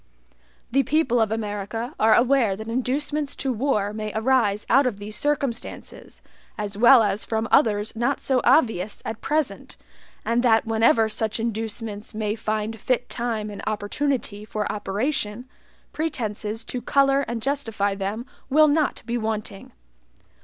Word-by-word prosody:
The 275 +3 +4
people 265 -4 +2
of 220 -1 +1
America 220 +3 -3
are 220 0 +5
aware 240 -5 +3
that 220 +2 -8
inducements 275 +5 -1
to 265 -1 -2
war 215 -4 0
may 215 0 -4
arise 220 -3 +2
out 270 +2 +4
of 225 -5 -2
these 210 +1 -7
circumstances, 275 -2 -3 0.3
as 205 -2 -4
well 240 +2 +7
as 205 0 0
from 225 0 -2
others 215 -6 +3
not 240 +5 0
so 260 -2 +1
obvious 215 - +2
at 220 - -5
present, 305 -1 -2 0.5
and 235 +1 +2
that 225 -3 +3
whenever 225 0 +3
such 220 +1 -1
inducements 220 -1 -4
may 210 -1 -1
find 215 0 -3
fit 245 +2 -1
time 225 -3 -3
and 205 - -7
opportunity 215 +1 -2
for 210 0 -3
operation, 210 +2 -2 0.5
pretenses 225 -7 -3
to 250 - -4
color 275 +1 +3
and 230 -1 -4
justify 225 -8 0
them 200 +4 -4 0.2
will 305 +3 +6
not 300 0 +1
be 240 0 -2
wanting. 215 -3 -4
225 Hz, 145 wpm, -24 LUFS, 210-255 Hz, 0.5 s, well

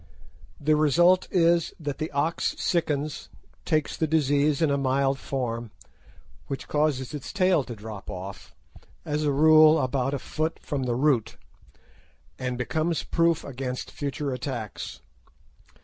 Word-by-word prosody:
The 155 +1 +3
result 175 +5 +4
is 170 -2 +2
that 145 -3 -4
the 155 - -2
ox 150 +4 -1
sickens, 150 -3 -1 0.4
takes 155 -3 0
the 160 - 0
disease 145 -1 +2
in 160 -3 +2
a - - +2
mild 135 0 +1
form, 120 -4 -3 0.8
which 135 - -5
causes 150 -3 0
its 145 -3 -6
tail 185 -6 +3
to 120 - -7
drop 105 -1 -9
off, 95 -1 -8 0.5
as 150 0 -1
a 145 - +2
rule 155 +2 +6
about 130 +1 0
a - - -1
foot 155 +4 -3
from 140 -3 -3
the 120 -1 0
root, 130 -4 +1 1.0
and 125 -1 -2
becomes 160 +6 -1
proof 165 -1 +1
against 130 -1 -5
future 140 -1 -3
attacks. 120 -4 -5
145 Hz, 135 wpm, -26 LUFS, 130-155 Hz, 1.0 s, rule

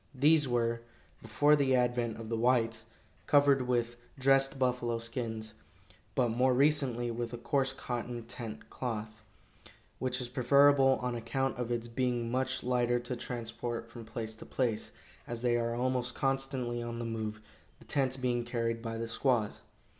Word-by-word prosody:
These 150 +2 +5
were, 115 -1 0 0.4
before 145 +7 +4
the 135 -3 +3
advent 120 -2 +1
of 115 - -7
the 115 - -1
whites, 115 -1 +1 0.4
covered 140 -2 +5
with 120 -1 0 0.2
dressed 135 +1 +3
buffalo 125 -2 0
skins, 115 -2 -4 0.6
but 125 -2 +3
more 125 +3 +3
recently 135 -4 +2
with 120 0 -4
a - - -3
coarse 135 +2 +1
cotton 120 -3 -4
tent 115 -2 -7
cloth, 110 -3 -4 0.8
which 130 0 -1
is 125 - -3
preferable 135 +2 +5
on 125 -1 -1
account 120 +3 -1
of 120 -1 -2
its 120 -1 -2
being 120 -1 -1
much 130 +1 0
lighter 120 -1 +2
to 125 +1 -4
transport 115 -1 -5
from 115 -1 -9
place 110 0 -5
to - - -9
place, 115 -5 -1 0.4
as 120 0 -5
they 120 -1 +3
are 115 0 0
almost 125 0 0
constantly 135 -3 -1
on 120 0 -4
the 120 - -4
move, 110 -2 -3 0.4
the - - -17
tents 135 -2 0
being 125 -2 0
carried 115 -1 -2
by 115 -1 -4
the 115 0 -3
squaws. 115 -2 +1
120 Hz, 160 wpm, -31 LUFS, 115-130 Hz, 0.8 s, These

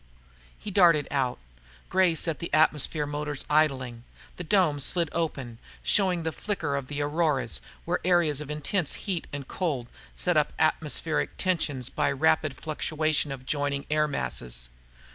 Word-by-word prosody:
He 210 - -7
darted 170 -6 +5
out. 130 -3 0 0.5
Gray 185 -3 +3
set 165 -1 -1
the 170 - -5
atmosphere 155 -1 +3
motors 145 -1 -3
idling. 130 -6 +1 0.3
The 180 - -4
dome 170 -5 +3
slid 170 +3 +2
open, 135 -8 -3 0.2
showing 185 -4 +2
the 160 - -1
flicker 160 -7 -2
of 140 -2 -3
the 145 +1 -2
auroras, 145 - 0 0.2
where - - 0
areas 170 -5 +3
of 150 - -7
intense 150 +3 -1
heat 185 -5 -2
and 140 -2 -6
cold 150 -10 -2 0.3
set 60 - +1
up - - +2
atmospheric 75 -1 0
tension 160 -8 0
by - - +2
rapid - - +2
fluctuation 155 -2 -1
of 135 -2 -6
adjoining 140 +1 -2
air 150 0 +3
masses. - - -3
150 Hz, 145 wpm, -27 LUFS, 140-170 Hz, 0.5 s, darted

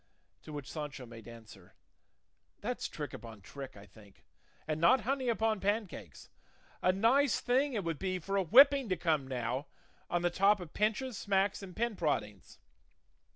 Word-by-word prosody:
To - - -11
which 145 -3 -6
Sancho 145 -4 -6
made 115 -2 -12
answer, 110 -5 -13 0.9
"That's - - -3
trick - - -6
upon 115 -3 -10
trick, 135 +3 -9
I 100 - -12
think, 100 0 -19 0.4
and 155 0 -2
not 195 +9 +5
honey 260 +2 -1
upon 220 -2 +1
pancakes; 195 - -3 0.5
a 185 - +4
nice 235 +8 +3
thing 265 +3 +1
it 210 -4 -1
would 165 -3 -3
be 185 -1 -1
for 195 +3 -4
a 195 - +3
whipping 270 - +6
to 185 - 0
come 155 -6 0
now, 125 +1 -3 0.4
on 175 0 0
the 175 - +2
top 195 +3 +4
of 175 -4 -9
pinches, 220 +2 -1
smacks, 195 0 +1
and 185 -3 -10
pin 235 -1 -1
proddings! 105 - -3
180 Hz, 165 wpm, -32 LUFS, 130-220 Hz, 0.9 s, whipping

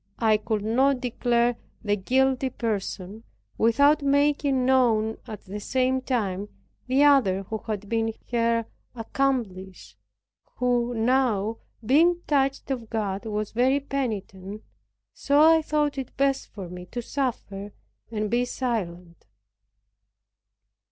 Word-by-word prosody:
I 220 -2 +3
could 215 -1 -2
not 260 +5 +2
declare 240 -1 +1 0.3
the 205 -1 +1
guilty 260 +5 +1
person, 210 -2 -4 0.4
without 285 +7 +4
making 280 -2 +2
known 230 -4 +3
at 215 -2 -7
the 205 +2 -7
same 260 +3 0
time 205 -6 -2 0.4
the 265 +3 +3
other 235 -10 +4
who 220 +3 -5
had 210 -2 -4
been 225 +1 0 0.2
her 230 -1 +1 0.3
accomplice, 225 -7 -3 0.6
who 245 -1 0
now, 225 -3 +1 0.3
being 335 +8 +4
touched 275 -1 0
of 235 -4 -4
God, 205 -1 -3
was 210 -1 -3
very 260 +4 +2
penitent, 215 -7 -4 0.7
I 315 +3 +6
thought 295 -2 0
it 260 - -7
best 275 0 +1
for 195 -4 -8
me 180 +1 -9
to 240 +4 -5
suffer 210 -7 -3 0.4
and 215 -2 -3
be 240 +1 +2
silent. 180 - -4
235 Hz, 120 wpm, -25 LUFS, 210-265 Hz, 0.7 s, I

